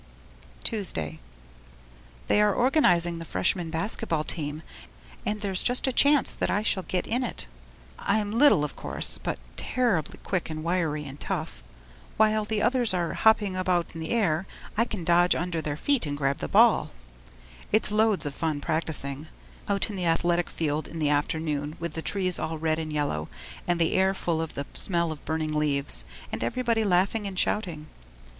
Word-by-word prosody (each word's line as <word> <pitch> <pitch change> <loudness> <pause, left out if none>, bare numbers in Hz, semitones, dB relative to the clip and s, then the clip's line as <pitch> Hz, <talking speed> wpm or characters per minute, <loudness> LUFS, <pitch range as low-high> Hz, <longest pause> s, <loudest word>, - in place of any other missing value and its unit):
Tuesday 80 - -1 1.1
They 210 - +3
are 210 -1 +3
organizing 175 - +3
the - - -6
Freshman 165 - 0
basket 200 +7 -3
ball 155 -2 +1
team 155 -1 -3 0.6
and 210 0 -1
there's 195 -3 +1
just 245 0 +4
a 265 - 0
chance 285 +2 +6
that - - -2
I 205 - +1
shall 205 -3 +1
get 180 -1 -2
in 245 +3 0
it. 240 - -4 0.5
I'm 205 0 0
little 235 - +5
of 145 - -7
course, - - -4
but - - -2 0.2
terribly 225 - 0
quick 185 -4 -2
and 155 0 -5
wiry 165 -4 0
and 140 +1 -9
tough. - - -4 0.6
While 215 0 +3
the 210 0 -1
others 240 -3 +3
are 175 -2 -1
hopping 210 -3 +3
about 180 -2 0
in 165 - -7
the 160 - -4
air, 190 -6 +1 0.3
I 230 - +3
can 210 -7 -5
dodge 175 +1 +4
under 170 -1 -2
their 150 -2 -3
feet 275 - +1
and 145 0 -3
grab 140 -1 0
the - - -3
ball. - - +4 0.8
It's 215 0 +3
loads 215 -4 +2
of 145 - -3
fun 155 -1 -2
practising 155 -1 -2 0.4
out 200 +2 0
in - - -6
the 180 -2 -2
athletic 175 +1 +1
field 155 -1 -2
in 165 - -8
the 150 -2 +1
afternoon 150 0 -1
with 170 -2 -4
the 160 - -4
trees 185 0 0
all 160 0 -3
red 155 0 0
and 155 -1 -4
yellow 145 - -2 0.4
and 175 -1 +1
the 165 - +2
air 190 +1 +3
full 165 -3 -1
of 160 - -5
the 140 - -3
smell 170 -3 0
of 155 - -8
burning 155 -1 -2
leaves, 140 - 0 0.3
and - - -3
everybody 235 -2 0
laughing 200 +2 +1
and 190 -1 -6
shouting. 175 -7 0
175 Hz, 180 wpm, -27 LUFS, 155-210 Hz, 1.1 s, chance